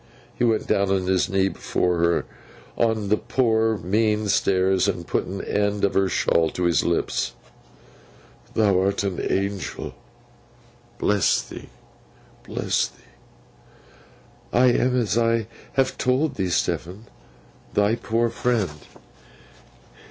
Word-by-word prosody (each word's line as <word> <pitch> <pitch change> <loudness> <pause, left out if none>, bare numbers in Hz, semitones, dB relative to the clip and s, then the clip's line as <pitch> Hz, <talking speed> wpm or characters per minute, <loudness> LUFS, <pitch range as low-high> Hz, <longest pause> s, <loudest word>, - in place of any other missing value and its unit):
he - - -3
went 115 -2 +2
down 100 0 +1
on 95 -1 +1
his 95 +3 +1
knee 95 -1 +2
before 90 -2 -1
her, 85 0 +2 0.5
on 110 -3 0
the 105 - +3
poor 115 -2 +1
mean 105 +3 0
stairs, 95 -1 +2
and 90 -4 -2
put - - -1
an 95 +1 -6
end 100 0 0
of 100 - -1
her 95 -1 +2
shawl 80 -2 +2
to 90 - -4
his 85 -2 +2
lips. - - -1 1.2
'Thou 100 -4 +3
art 100 +1 0
an 95 -3 -2
Angel. 100 -1 -2 1.0
Bless 105 -2 +2
thee, - - -11 0.8
bless - - 0
thee!' - - -26 0.7
'I 125 +2 +4
am, 125 +1 +2
as 115 -1 +1
I 115 -1 +1 0.3
have 135 -1 0
told 135 +4 +1
thee, 95 -6 -2
Stephen, 90 +4 -2 0.7
thy 105 +1 +3
poor 115 0 0
friend. 105 -11 -1
100 Hz, 125 wpm, -23 LUFS, 95-115 Hz, 1.2 s, I